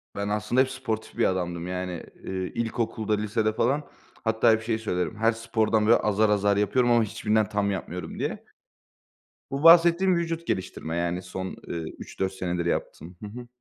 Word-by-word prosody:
Ben 100 0 -2
aslında 105 +4 +2
hep 130 - +1
sportif 115 -4 -4
bir 115 - +3
adamdım, 90 -2 -1
yani, 90 -1 -4 0.2
eee, - - -6 0.2
ilkokulda 115 -2 -1
lisede 105 +1 0
falan 135 +7 +1 0.4
hatta 110 0 +3
hep 110 - +2
şeyi 115 0 -1
söylerim: 90 -1 -2
"Her 115 +1 +3
spordan 110 0 +2
azar 105 0 +3
azar 100 -1 +2
yapıyorum 120 +4 +2
ama 120 -1 +5
hiçbirinden 105 0 0
tam 100 -1 0
yapmıyorum." 90 -2 -5
diye. - - -3 1.1
Bu 140 +3 -3
bahsettiğim 170 +2 +7
vücut 170 0 -2
geliştirme, 85 -3 -3
yani, 85 +1 -1
son, 95 0 -6
eee, 85 - -4 0.2
3-4 95 0 -4
senedir 90 -2 -2
yaptığım. 85 0 -3
Hı - - -4
hı. 120 +3 -9
110 Hz, 165 wpm, -26 LUFS, 95-115 Hz, 1.1 s, bahsettiğim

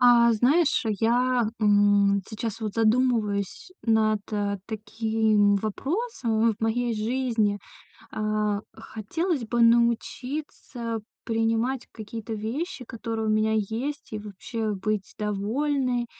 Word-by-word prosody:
А, 235 -1 +6
знаешь, 275 +8 +3 0.2
я, 245 0 +2
м, 205 -1 +4
сейчас 225 0 -4
вот 215 -2 -3
задумываюсь 225 - +1
над, 220 -2 +2
э, 205 -1 -1
таким 220 -1 +1
вопросом 230 - 0
в - - -11
в - - -47
моей 230 +1 0
жизни. 220 -2 0 0.5
А, 215 -1 0
хотелось 290 - -3
бы 235 +2 0
научиться 235 +1 0 0.3
принимать 225 +3 0
какие-то 225 +1 -7
вещи, 250 - -4
которые 225 -1 -4
у - - +1
меня 215 0 +2
есть, 230 +7 -2
и 215 - -3
вообще 210 +2 -4
быть 205 0 -2
довольной. 245 +5 0
225 Hz, 110 wpm, -26 LUFS, 215-245 Hz, 0.5 s, А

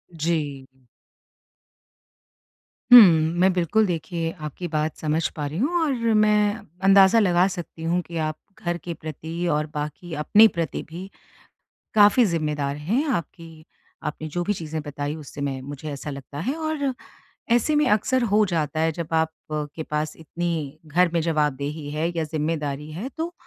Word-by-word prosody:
जी। 150 -4 -2 2.3
हुँ, 245 - +14
मैं 175 0 +4
बिल्कुल 185 +5 +2
देखिए 165 -2 -2
आपकी 150 +4 -5
बात 155 +1 0
समझ 155 +1 0
पा 150 - -3
रही 145 +3 -4
हूँ 335 +7 +1
और 300 - +1 0.2
मैं 210 0 +3 0.3
अंदाज़ा 195 +3 +6
लगा 180 -3 +4
सकती 175 -3 -7
हूँ 175 +2 +1
कि 170 -1 -8
आप 155 0 -3 0.3
घर 175 0 -1
के 170 - -4
प्रति 160 +3 -5
और 150 +1 +1
बाकी 150 +3 -5
अपने 215 +8 +6
प्रति 170 -7 -3
भी, 180 +4 -8 0.8
काफ़ी 210 +3 +6
ज़िम्मेदार 150 -5 -1
हैं, 220 - 0
आपकी, 165 - -5 0.4
आपने 155 +1 -4
जो 175 +3 -2
भी 205 - 0
चीज़ें 160 -4 -5
बताई 145 +1 -4
उससे 145 -2 -9
मैं 135 -2 -2
मुझे 145 +2 -7
ऐसा 145 +1 -6
लगता 140 +1 -8
है 260 - -2
और 310 -4 -2 0.6
ऐसे 240 +6 +3
में 300 0 +3
अक्सर 245 +5 +2
हो 210 0 +4
जाता 155 -5 -1
है 160 +1 +2
जब 165 0 -5
आपके 160 -1 -2
पास 150 0 -3
इतनी, 160 -2 -4
घर 170 +4 +2
में 170 - +2
जवाबदेही 150 -2 -1
है 155 +3 -1
या 160 - +1
ज़िम्मेदारी 150 -1 -3
है। 185 +11 -5
तो 335 +2 -3
165 Hz, 155 wpm, -24 LUFS, 150-190 Hz, 2.3 s, हुँ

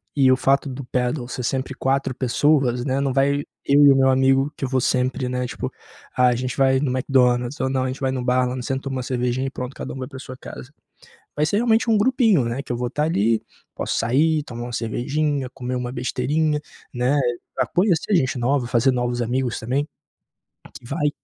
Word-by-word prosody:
E 135 -3 +5
o 130 - +6
fato 135 +2 +2
do 135 +1 -6
pedal 125 +1 -1
ser 125 0 -5
sempre 130 +2 -2
4 135 +1 0
pessoas, 130 -1 +1
né. 135 0 0
Não 140 -1 0
vai 140 +1 +2 0.2
eu 145 +1 +5
e 140 - +8
o - - +5
meu 135 0 +4
amigo, 135 +2 +3
que - - -7
eu - - -4
vou 130 0 +1
sempre, 125 +1 0
né. 125 0 -2
Tipo, 120 - -4 0.5
ah, 125 0 +4
a 125 - +3
gente 125 +1 -3
vai 135 -1 +3
no 140 -1 0
McDonald's 125 0 +1
ou 130 - 0
não, 130 -1 0
a 130 - -1
gente 130 - -5
vai 130 -1 +1
no 130 -2 -3
bar 125 0 +2
lá 125 0 -4
sempre 135 +2 -3
toma 135 -1 -3
uma 130 - -3
cervejinha 125 +1 -1
e - - -2
pronto, 125 0 -6
cada - - -6
um - - -7
vai 130 - -5
para - - -13
a - - -8
sua 130 -2 -9
casa. 130 - -10 0.7
Vai 150 - +2
ser 160 - 0
realmente 230 +1 +2
um 220 - +4
grupinho, 225 - +3
né, 120 +4 -3
que 125 - -5
eu - - -2
vou 125 - -1
estar 150 +5 -1
ali. 115 -7 +1 0.3
Posso - - -2
sair, 150 +7 +2
tomar 120 -2 -7
uma 120 - -7
cervejinha, 135 +4 -1
comer 125 -1 -5
uma 125 0 -3
besteirinha, 145 +5 0 0.4
né, 125 +4 +1 0.4
pra - - 0
conhecer 185 +1 +1
gente 130 -7 +1
nova, 125 +1 +1
fazer 120 +1 +3
novos 120 -1 -1
amigos 125 +1 -1
também. 135 +6 -1 1.0
Vai 145 +4 -1
130 Hz, 225 wpm, -22 LUFS, 125-140 Hz, 1.0 s, e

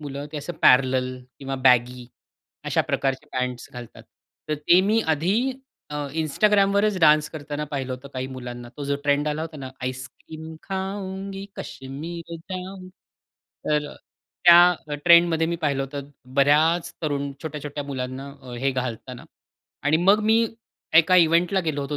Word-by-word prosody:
मुलं 145 -1 -6
ते - - -5
असं 175 +4 -6
पॅरॅलल 130 0 +4 0.2
किंवा 135 -1 -4
बॅगी 125 0 +3 0.6
अशा - - +2
प्रकारचे 135 +2 -2
पँट्स 125 -1 -3
घालतात. 120 -2 -10 0.5
तर 155 - +1
ते 170 +5 +4
मी 210 +4 +2
आधी 195 - +1 0.4
अ, - - -5 0.3
Instagramवरच 200 +4 +2
डान्स 150 -1 +5
करताना 150 -1 -5
पाहिलं 135 -2 -3
होतं 130 +2 -8
काही 130 0 -4
मुलांना. 120 -2 -8
तो 145 - -5
जो 140 0 -1
ट्रेंड 145 +1 +2
आला 150 +1 -2
होता 160 -1 -7
ना 135 -2 -7
आईसक्रीम 145 +5 -7
खाउंगी, 195 0 -5
कश्मीर 165 +6 -7
जाउंगी. 185 +2 -8 0.8
तर 150 -1 0 0.5
त्या 175 -3 +6
ट्रेंडमध्ये 170 -1 +5
मी 170 +1 -2
पाहिलं 145 -4 -1
होतं 140 +1 -7 0.2
बऱ्याच 155 +5 +3
तरुण 140 -2 -2
छोट्या-छोट्या 150 -2 -5
मुलांना 130 0 -5
अ, 125 -1 -10
हे 135 +2 +1
घालताना 125 -1 -5 0.6
आणि 145 +2 +3
मग 200 +3 +5
मी 225 +1 +4 0.5
एका 170 +3 +6
इव्हेंटला 175 +3 +4
गेलो 155 -4 -2
होतो 145 +1 -4
150 Hz, 140 wpm, -24 LUFS, 135-175 Hz, 0.8 s, त्या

